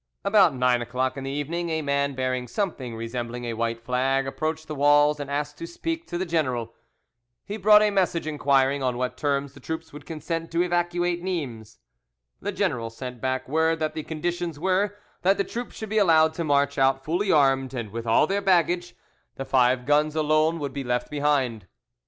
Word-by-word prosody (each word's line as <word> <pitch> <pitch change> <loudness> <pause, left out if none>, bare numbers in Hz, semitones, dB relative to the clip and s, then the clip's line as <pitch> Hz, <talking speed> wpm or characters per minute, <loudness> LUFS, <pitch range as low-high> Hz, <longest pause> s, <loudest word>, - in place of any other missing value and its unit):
About 200 -7 +5
nine 125 -1 +2
o'clock 130 +2 -2
in 135 -1 -6
the - - -3
evening, 160 +5 -3
a 160 -1 -1
man 140 -1 0
bearing 130 -1 -2
something 130 - -3
resembling 120 +1 -5
a 115 - -3
white 115 0 -2
flag 130 +2 +1
approached 155 +3 -3
the 155 - -4
walls 145 +1 +4
and 145 -1 -5
asked 145 +1 -3
to 165 - -5
speak 330 - -4
to 175 - -3
the 185 - -1
general. 130 -9 -1 0.7
He 205 - -5
brought 210 +1 +6
a 210 - +2
message 180 -4 +1
inquiring 140 -2 +2
on 125 -2 0
what 125 0 -2
terms 140 0 -1
the - - -14
troops 160 -1 -6
would 145 -1 -11
consent 165 +1 -4
to 170 +1 +3
evacuate 175 0 0
Nimes. 130 - -4 0.6
The - - -2
general 115 -2 -1
sent 125 +1 -8
back 130 0 -2
word 160 +3 +2
that 155 -1 -2
the 155 - -4
conditions 170 +1 -3
were, 190 +3 +1 0.3
that 195 +2 +3
the 200 - +2
troops 240 +3 -6
should 220 - -6
be 215 +1 +2
allowed 160 -5 +5
to 170 - -3
march 140 -2 +1
out 135 0 +2
fully 185 +5 0
armed 135 -3 +3
and 115 -4 -4
with 115 +1 -5
all 115 +6 +4
their 195 +4 -1
baggage; 175 -2 +1 0.4
the 135 - -5
five 125 -1 +2
guns 150 +2 +2
alone 155 +1 +2
would 140 -4 -4
be 140 - -4
left 125 +1 -2
behind. 140 -9 0
145 Hz, 195 wpm, -25 LUFS, 130-170 Hz, 0.7 s, brought